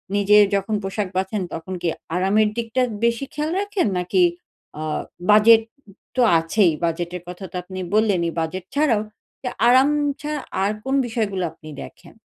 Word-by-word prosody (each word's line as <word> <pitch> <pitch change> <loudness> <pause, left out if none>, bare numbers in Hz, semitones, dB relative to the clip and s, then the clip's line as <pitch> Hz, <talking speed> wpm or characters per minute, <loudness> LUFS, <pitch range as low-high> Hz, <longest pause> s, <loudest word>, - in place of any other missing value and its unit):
নিজে 205 +1 +5 0.2
যখন 200 +2 -1
পোশাক 195 +1 -2
বাঁচেন 190 +2 -1
তখন 175 +3 -6
কি 175 - -1 0.3
আরামের 205 +4 +3
দিকটা 235 +2 -1 0.2
বেশি 235 +3 0
খেয়াল 300 +2 -2
রাখেন? 405 - 0
নাকি 180 +1 +2 0.6
আ - - -4 0.5
বাজেট 220 +2 +7 0.5
তো 255 - +2 0.2
আছেই 170 +3 +2
বাজেটের 170 +1 -2
কথা 180 +2 -8
তো - - -11
আপনি 185 +1 -8
বললেনই। 195 -6 +2
বাজেট 175 +3 -3
ছাড়াও, 280 -8 +3 0.7
আরাম 260 +3 +6 0.3
ছা 300 +1 -4 0.3
আর 200 - +2
কোন 265 +1 -1
বিষয়গুলো 210 -6 -2
আপনি 155 - -14
দেখেন? - - -14
205 Hz, 145 wpm, -22 LUFS, 180-230 Hz, 0.7 s, বাজেট